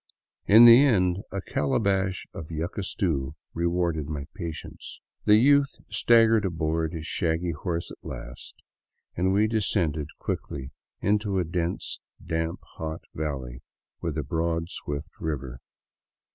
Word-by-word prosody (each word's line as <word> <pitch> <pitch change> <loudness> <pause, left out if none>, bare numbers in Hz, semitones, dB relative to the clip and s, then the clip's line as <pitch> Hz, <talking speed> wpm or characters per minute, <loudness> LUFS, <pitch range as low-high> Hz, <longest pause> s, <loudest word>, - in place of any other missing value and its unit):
In 110 +4 +9
the 120 +3 +10
end, 90 -9 +3
a 100 - -3
calabash 95 +4 0
of 80 - -8
yuca 85 +5 -3
stew 75 -8 -1 0.2
rewarded 85 -3 0
my 75 -2 -4
patience. 80 -2 -7 0.3
The 105 - +7
youth 140 +3 +4 0.2
staggered 115 -2 +5
aboard 80 -3 -1
his 80 -2 -6
shaggy 85 +1 0
horse 85 +2 -3
at - - -13
last - - -9 0.5
and 95 +2 +1
we 100 +2 +4
descended 95 -9 0
quickly 65 0 -4 0.3
into 105 0 +1
a 90 - +2
dense, 85 +1 -3 0.3
damp 80 0 -2 0.2
hot 80 0 -5
valley 65 -5 -4 0.4
with - - -3
a - - -1
broad, 85 +1 -1
swift 75 +2 -6
river. 70 -6 -4
85 Hz, 130 wpm, -26 LUFS, 80-100 Hz, 0.5 s, the